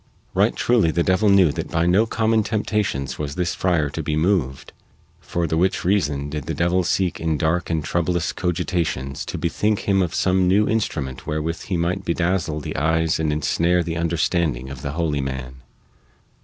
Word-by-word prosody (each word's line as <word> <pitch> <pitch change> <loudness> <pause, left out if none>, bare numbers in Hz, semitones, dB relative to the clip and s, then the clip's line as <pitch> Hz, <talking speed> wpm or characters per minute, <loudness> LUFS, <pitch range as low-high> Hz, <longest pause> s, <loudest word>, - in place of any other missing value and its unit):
Right - - +2
truly 115 -9 +2
the 85 +2 +1
devil 95 +4 +2
knew 95 -5 +5
that - - -5
by 85 0 +1
no 95 +6 +3
common 110 0 +2
temptations 105 - -2
was 75 -2 -4
this 90 0 -1
friar 85 -5 +1
to 80 - -4
be 75 0 -2
moved, 80 -5 0 0.5
for 85 -1 -2
the 80 - -1
which 95 +1 +1
reason 75 -7 +1
did 75 -1 -5
the 80 - -2
devil 85 +4 +1
seek 90 0 0
in 80 -2 0
dark 80 +4 0
and 80 -2 0
troublous 85 +1 -1
cogitations 85 -6 -2
to - - -4
bethink 105 +5 0
him 95 -1 +2
of 90 -3 -1
some 95 -1 +2
new 100 +3 +3
instrument 75 - -2
wherewith 80 +2 -3
he 95 - -1
might 90 +3 -1
bedazzle 85 -3 -1
the - - -5
eyes 80 +2 +1
and 80 -1 0
ensnare 85 +4 +1
the 85 0 -4
understanding 80 -5 0
of 65 -1 -8
the 70 0 -4
holy 75 -3 -1
man. 65 -1 -5
85 Hz, 185 wpm, -22 LUFS, 75-95 Hz, 0.5 s, knew